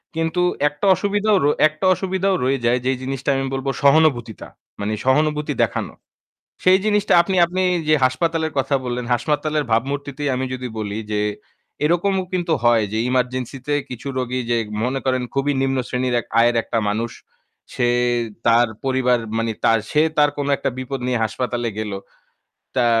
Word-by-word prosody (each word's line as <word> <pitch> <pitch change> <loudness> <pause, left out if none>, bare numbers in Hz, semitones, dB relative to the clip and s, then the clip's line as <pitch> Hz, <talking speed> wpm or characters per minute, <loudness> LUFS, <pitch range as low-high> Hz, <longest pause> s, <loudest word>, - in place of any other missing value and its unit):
কিন্তু 165 +2 0 0.3
একটা 150 +6 -4
অসুবিধাও 205 +2 +1
র - - +3 0.2
একটা 155 +5 -5
অসুবিধাও 190 +1 0
রয়ে 135 +1 +1
যায় 120 +2 +3
যেই 130 0 +1
জিনিসটা 135 +1 -3
আমি 135 - -1
বলব 135 +1 -3
সহানুভূতিতা, 140 -6 +2 0.3
মানে 105 +1 -2
সহানুভূতি 150 +2 +1
দেখানো। - - -2 0.7
সেই 185 +1 +6
জিনিসটা 210 -1 +1
আপনি 190 +2 -2
আপনি 185 +2 -2 0.3
যে 155 - +5
হাসপাতালের 160 +4 0
কথা 140 +1 0
বললেন, 125 0 -3
হাসপাতালের 150 +4 -1
ভাবমূর্তিতেই 140 +4 -1
আমি 130 +1 -1
যদি 125 0 -5
বলি 105 0 -3
যে 105 0 0 0.6
এরকমও 185 +4 +1
কিন্তু 175 -3 0
হয় 115 -2 +4
যে 110 - -1
ইমার্জেন্সিতে 130 +2 -2 0.2
কিছু 125 +2 -6
রোগী 130 0 -2
যে 120 - +3 0.3
মনে 135 +2 -1
করেন 130 -1 +1
খুবই 140 +1 +1
নিম্ন 135 0 0
শ্রেণীর 125 0 -1
এক - - -15
আয়ের 120 0 +3
একটা 115 - -2
মানুষ, 115 +3 -1 0.6
সে 120 - +1 0.6
তার 120 +1 +5 0.2
পরিবার 130 -2 +2 0.2
মানে 115 0 -1
তার, 115 - +4
সে 150 - +2 0.2
তার 145 -1 +5
কোন 145 - -2
একটা - - -2
বিপদ 130 +1 -4
নিয়ে 125 -3 0
হাসপাতালে 120 +1 -2
গেল। 110 -1 -3 0.8
তা 125 - +3
135 Hz, 160 wpm, -21 LUFS, 120-155 Hz, 0.8 s, সেই